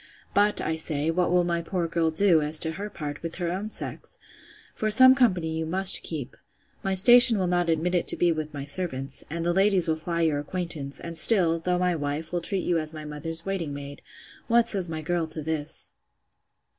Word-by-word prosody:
But, 205 +1 +1
I 160 - -3
say, 155 -1 -2
what 180 +1 -1
will 180 0 +2
my 170 -1 -2
poor 170 0 -4
girl 165 0 -1
do, 165 0 +4
as 150 +1 +1
to 160 - +1
her 200 +6 -7
part, 150 -6 -8
with 165 0 -7
her 175 -2 -4
own 195 +4 -5
sex? - - -2 0.6
For 215 - -3
some 260 +4 +7
company 185 -11 0
you - - -3
must 185 +3 +2
keep. 150 -6 -6 0.5
My 195 0 -2
station 240 +3 +9
will 190 - -1
not 175 -1 -1
admit 165 +2 -1
it 175 - -1
to - - +1
be 175 -1 +1
with 155 -1 -5
my 140 -2 -8
servants; 140 -4 -1
and 165 +2 -5
the 175 - 0
ladies 195 -1 +1
will 160 - 0
fly 170 +2 -4
your 155 -3 0
acquaintance; 150 -3 -6
and 165 -1 -1
still, 170 -7 +5
though 180 +2 -2
my 180 -1 -1
wife, 150 +2 -5
will 175 - -2
treat 190 +2 -3
you 170 -2 0
as 155 0 -6
my 155 0 -9
mother's 160 +2 -6
waiting 175 -7 -4
maid.—What 145 +11 -4
says 190 -6 +3
my 155 -1 -6
girl 170 0 -2
to 155 0 -3
this? 155 -1 -1
170 Hz, 210 wpm, -24 LUFS, 155-185 Hz, 0.6 s, station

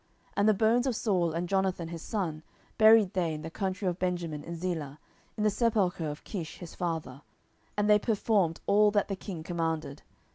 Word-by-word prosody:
10:021:014 - - -36
And 205 +2 +4
the - - +6
bones 230 +5 +3
of 255 - 0
Saul 185 -7 +1
and 170 +2 -2
Jonathan 190 -3 0
his 165 -1 -6
son 170 -8 -3 0.4
buried 220 -3 +7
they 170 -4 0
in 155 - -7
the 160 - -6
country 190 +1 -2
of 180 0 -1
Benjamin 175 -5 -2
in 170 - -6
Zelah, 160 -5 -4 0.4
in 210 - -1
the 210 - +3
sepulchre 195 -8 +1
of 150 +1 -7
Kish 170 -7 -6
his 175 -3 -9
father: 160 -6 -4 0.6
and 205 0 +2
they 210 0 +6
performed 205 -6 +1
all 210 +1 +5
that 205 -1 +1
the 195 - -1
king 185 -4 -7
commanded. 160 -4 -3
180 Hz, 195 wpm, -29 LUFS, 165-210 Hz, 0.6 s, buried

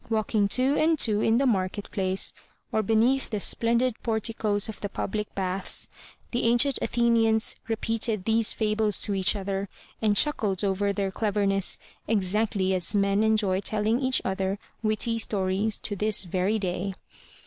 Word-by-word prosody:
Walk 220 -2 -1
ing 205 -2 +3
two 255 +7 +2
and 320 +1 +2
two 215 -6 +3
in 225 +1 +3
the 275 - +2
market 200 -3 -1
place, 190 -1 0 0.4
or 220 - +1
beneath 225 +6 +2
the 215 - -2
splendid 235 +4 +2
porticoes 220 -2 0
of 220 - -8
the 205 - -3
public 210 +1 -4
baths, 190 0 -3 0.4
the 240 - -1
ancient 240 +4 +2
Athenians 230 -2 +2
repeated 225 -2 -1
these 225 0 +3
fables 215 -1 +1
to 205 - +1
each 190 +1 +2
other 195 0 -3 0.3
and 210 -2 +2
chuckled 210 -11 +1
over 200 0 0
their 195 -1 -2
cleverness, 200 -2 0 0.3
exactly 200 -1 +1
as 185 +3 +2
men 200 0 +2
enjoy 215 -4 +2
telling 215 +3 0
each 260 -1 +1
other 190 +1 -1 0.2
witty 230 +1 0
stories 200 0 0
to 205 - -2
this 210 0 +1
very 185 +4 0
day. 190 -1 -3
210 Hz, 155 wpm, -26 LUFS, 195-225 Hz, 0.4 s, ing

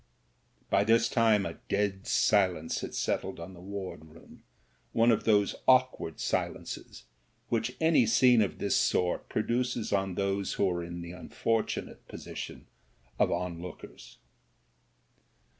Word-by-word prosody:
*' - - -39
By 100 - +4
this 115 +2 +4
time 110 -4 +3
a - - -6
dead 100 -1 -1
silence 90 -6 +2
had - - -6
settled - - -2
on 85 +3 -8
the 85 - -13
ward 95 -4 -6
room, 80 +1 -16 0.5
one 115 +1 +4
of 110 - 0
those 105 -2 +3
awkward 130 - +3
silences - - -3 0.5
which 115 +1 -1
any 160 -7 +4
scene 125 +1 +5
of 100 - -1
this - - 0
sort 90 -1 +1
produces 120 0 -1
on 95 -2 0
those 100 0 -1
who 100 - +1
are 85 -1 -2
in 85 0 -6
the 85 0 -7
unfortu 110 +5 -2
nate - - -15
position - - -8 0.5
of - - +3
onlookers. 90 0 -6
100 Hz, 140 wpm, -29 LUFS, 90-115 Hz, 0.5 s, scene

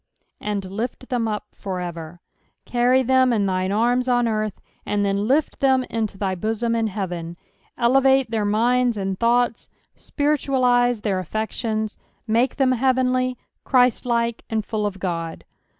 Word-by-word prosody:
"And 205 -2 -3
lift 230 +7 -5
them 245 -3 0
vpfor 190 -4 -4
eeer." 165 +1 -9 0.5
Carry 250 +2 +3
them 260 0 +3
in 210 -4 +1
thine 185 0 0
arms 245 +4 +2
on 245 -1 +3
eartn, 215 -2 -1 0.3
and 205 0 0
then 200 +1 0
lift 290 +5 +1
them 265 -1 +3
into 220 -3 -2
thy 195 -1 -1
bosom 225 +5 -1
in 225 -1 +1
heaven. 175 -4 -5 0.4
Elevate 265 +1 +3
their 220 -2 0
minda 235 +2 +2
and 190 -1 -3
thoughts, 240 0 +1 0.2
spiritualise 255 -5 +1
their 195 -3 -1
aSections, 220 +2 -3 0.3
make 230 +4 +1
them 265 -2 +2
heavenly, 255 0 +1 0.3
Chriatlike, 240 -2 +2
and 220 -3 -1
full 210 -2 -1
of 195 -1 -6
Ood. 165 -3 -3
230 Hz, 140 wpm, -22 LUFS, 205-250 Hz, 0.5 s, Carry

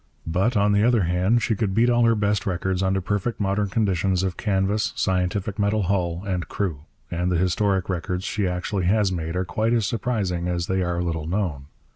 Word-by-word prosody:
But, 95 +8 +1
on 100 +1 +3
the 100 0 +3
other 120 -3 +3
hand, 90 +7 +2
she 110 - +1
could 100 -2 -1
beat 115 +2 +4
all 120 0 +4
her 115 0 +4
best 105 -1 0
records 95 0 -1
under 95 0 +1
perfect 105 +5 -2
modern 100 0 0
conditions 95 -3 +1
of 95 -2 -1
canvas, 100 +1 0
scientific 95 +2 -1
metal 105 +1 +1
hull, 90 -2 -1
and 90 -3 -2
crew; 80 -7 -3 0.3
and 90 +1 -1
the 90 - +2
historic 95 +1 +1
records 90 0 -2
she 105 -1 -1
actually 90 +1 -2
has 100 +1 +2
made 80 -1 -3
are 90 0 0
quite 110 +5 0
as 115 -3 +2
surprising 100 -6 -1
as 85 -1 -1
they 95 +1 0
are 85 -1 -1
little 80 -3 -3
known. 85 -7 -2
95 Hz, 200 wpm, -24 LUFS, 90-105 Hz, 0.3 s, beat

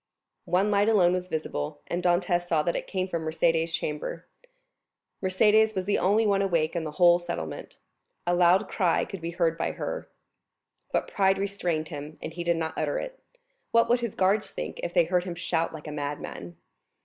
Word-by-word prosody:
One 190 +4 +2
light 205 +1 +3
alone 180 -5 +4
was 180 0 -2
visible; 75 - -4
and 175 - -2
Dantès 175 0 +1
saw 160 -3 +2
that 170 - 0
it - - -3
came 185 -1 -2
from 170 -3 -3
Mercédès' 165 +1 +1
chamber. 150 -2 -3 1.0
Mercédès 215 +3 +3
was 190 -1 -1
the 205 - +1
only 210 +4 +3
one 200 -1 +2
awake 170 -4 +1
in 170 - -1
the 150 - -5
whole 175 0 +5
settlement. 80 - -6 0.5
A 175 - +2
loud 175 +1 +4
cry 180 -4 +1
could 195 - -8
be 165 - -3
heard 170 -1 0
by - - -1
her. - - -5 0.8
But - - 0
pride 195 -1 +3
restrained 180 -6 -2
him 150 +1 -7
and - - -6
he 175 0 -4
did 170 -1 +1
not 160 -1 -2
utter 145 -1 -1
it. - - -6 0.5
What 230 0 +4
would 240 +1 +4
his 235 -4 -4
guards 195 +3 +2
think - - -6
if 170 - -3
they 175 -1 +4
heard 175 +2 +1
him 175 -2 -4
shout 170 -1 -1
like 155 -2 -9
a - - -5
madman? 145 - -5
175 Hz, 195 wpm, -27 LUFS, 160-195 Hz, 1.0 s, whole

